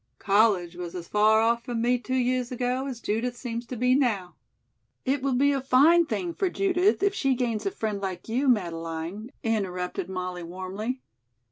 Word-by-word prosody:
College 195 -4 +2
was 175 -1 -6
as 170 -2 -6
far 215 +1 +4
off 235 +1 +2
from 240 -2 -3
me 245 +2 +2
two 255 +2 -3
years 250 -1 0
ago 250 +2 -1
as 250 -4 -6
Judith 240 +4 -2
seems 235 -1 -5
to 255 - -5
be 250 +2 +2
now 220 -10 +1 0.4
" - - -49
"It 270 +1 +1
will 270 -1 0
be 280 +3 +4
a 275 -1 0
fine 300 +6 +5
thing 345 0 -2
for 380 +2 0
Judith 390 +2 +2
if 400 0 +3
she 270 -9 +1
gains 240 - -1
a - - +3
friend 215 - -3
like 190 -2 -5
you, 255 +5 0
Madeleine," 170 -1 -1
interrupted 185 -5 -2
Molly 180 -1 -4
warmly. 190 +8 -5
235 Hz, 190 wpm, -26 LUFS, 190-260 Hz, 0.4 s, fine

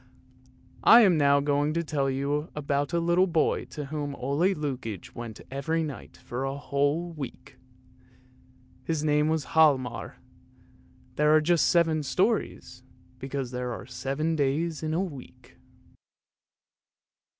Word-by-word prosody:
I 235 - +9
am 190 -6 +5
now 140 -2 +4
going 145 +2 0
to 170 - 0
tell 145 -3 -1
you 140 +4 -2
about 145 0 -1
a 170 - +1
little 170 +3 +3
boy 165 -3 +1
to 150 - -7
whom 145 -2 -3
Ole 140 +3 -3 0.2
Lukoie 130 - -5
went 115 -2 -8
every 160 +4 -1
night 145 -4 -8
for 125 +2 -5
a 135 +1 -3
whole 145 +5 -1
week. 150 -6 -9 1.3
His 155 +1 -2
name 150 0 +2
was 160 -2 0
Hialmar. 130 -7 +2 1.0
There 150 +1 +4
are - - +6
just 165 +2 +2
seven 165 -2 +3
stories, 185 - -1 0.4
because 135 -1 -4
there 125 -1 -3
are 120 - -8
seven 135 +6 -2
days 150 +2 -1
in 155 0 -2
a 180 - +1
week. 130 -7 -11
145 Hz, 135 wpm, -27 LUFS, 135-160 Hz, 1.3 s, I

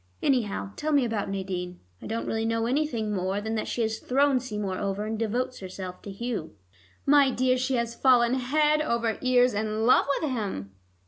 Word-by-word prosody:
Anyhow, 220 -7 0
tell 310 +1 -2
me 285 -4 +4
about 220 -4 -2
Nadine. 185 -2 -4 0.2
I - - -7
don't 225 +1 -3
really 225 0 -1
know 230 0 0
anything 240 -5 0
more 190 +1 -1
than 220 +2 -3
that 220 - -2
she 235 - -1
has 220 0 -2
thrown 275 +1 +2
Seymour 210 -6 -4
over, 200 +1 -2
and 220 +1 -2
devotes 245 +3 -1
herself 185 -1 -7
to - - -9
Hugh." 205 - -4 0.5
"My 280 -1 +6
dear, 255 0 +2
she 260 +1 0
has 235 -1 -1
fallen 240 -1 +4
head 300 +4 +2
over 235 -6 0
ears 250 -1 +4
in 215 +1 -1
love 255 - +5
with 310 -4 -2
him." 195 - -3
230 Hz, 190 wpm, -27 LUFS, 205-255 Hz, 0.5 s, My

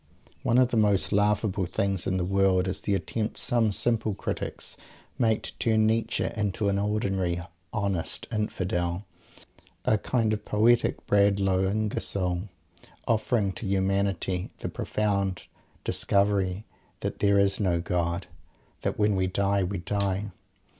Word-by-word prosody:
One 120 - +2
of 125 -1 +5
the 120 - 0
most 105 -3 +3
laughable 105 -2 +1
things 95 0 -1
in 95 - +1
the 90 - 0
world 95 -1 +2
is 95 - -2
the 100 - +1
attempt 110 +2 -3
some 115 -3 +3
simple 110 -1 0
critics - - -4 0.4
make 110 -3 +2
to - - -6
turn 110 -1 +3
Nietzsche 115 +1 +1
into 105 -1 0
an 100 0 +1
ordinary 95 -4 0 0.3
"Honest 100 -5 -2
Infidel," 95 -3 -1 0.8
a 110 - +3
kind 115 -2 +1
of 105 -1 -3
poetic 115 +4 +2
Bradlaugh 100 -2 +3
Ingersoll, 100 -3 -1 0.6
offering 110 -2 +1
to 100 - -6
humanity 95 -1 0
the - - -4
profound 100 -3 -1 0.4
discovery 100 -1 +1 0.4
that - - -3
there 100 -1 +4
is 100 0 +3
no 90 -5 +1
God, 85 +1 -1
and - - -29
that - - -2
when 105 -1 +2
we 95 -1 +1
die, 100 +1 +1
we 100 +2 -2
die! 100 +2 -1
100 Hz, 140 wpm, -27 LUFS, 95-105 Hz, 0.8 s, of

